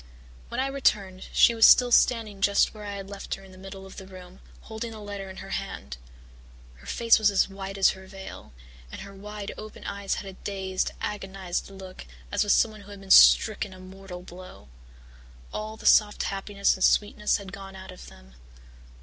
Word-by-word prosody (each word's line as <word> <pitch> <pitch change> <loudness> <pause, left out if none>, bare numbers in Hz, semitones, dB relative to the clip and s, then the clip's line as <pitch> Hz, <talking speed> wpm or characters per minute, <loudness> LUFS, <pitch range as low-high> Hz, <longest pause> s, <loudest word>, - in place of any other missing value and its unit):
"When - - -4
I 265 - +1
returned 205 -9 0
she 235 - +6
was 225 -1 +7
still 250 -1 +6
standing 220 -5 +3
just 200 0 +3
where 210 -1 -10
I 205 0 -5
had 195 -1 -7
left 200 0 -5
her 195 - -15
in 190 - -15
the 185 - -15
middle 195 0 -9
of 190 - -13
the 190 - -9
room, 185 -1 -13 0.2
holding 220 +1 -6
the 220 - -9
letter 200 -2 -7
in 190 - -10
her - - -10
hand. 65 -1 -5 0.8
Her - - -16
face 230 -1 +4
was 215 -1 +4
as 200 - +2
white 195 0 -7
as 195 - +5
her 190 0 -12
veil, 190 - -10 0.4
and - - -8
her 200 - -10
wide 205 +1 -7
open 215 0 -10
eyes 200 -1 -3
had - - -6
a 195 - -8
dazed, 190 -1 -3
agonized 195 -3 -4
look 190 -1 -11 0.2
as - - +2
of 205 - +1
someone 215 -2 +2
who 200 - -15
had 200 -1 -10
been 195 -1 -7
stricken 205 -1 +6
a - - -14
mortal 185 -1 -10
blow. 180 - -12 0.8
All 215 +1 -5
the - - -13
soft 210 -1 +5
happiness 200 0 0
and 190 - -3
sweetness 210 0 +2
had 195 -1 -10
gone 195 -1 -9
out 190 0 -10
of 180 - -12
them. 65 0 -16
195 Hz, 200 wpm, -26 LUFS, 190-210 Hz, 0.8 s, was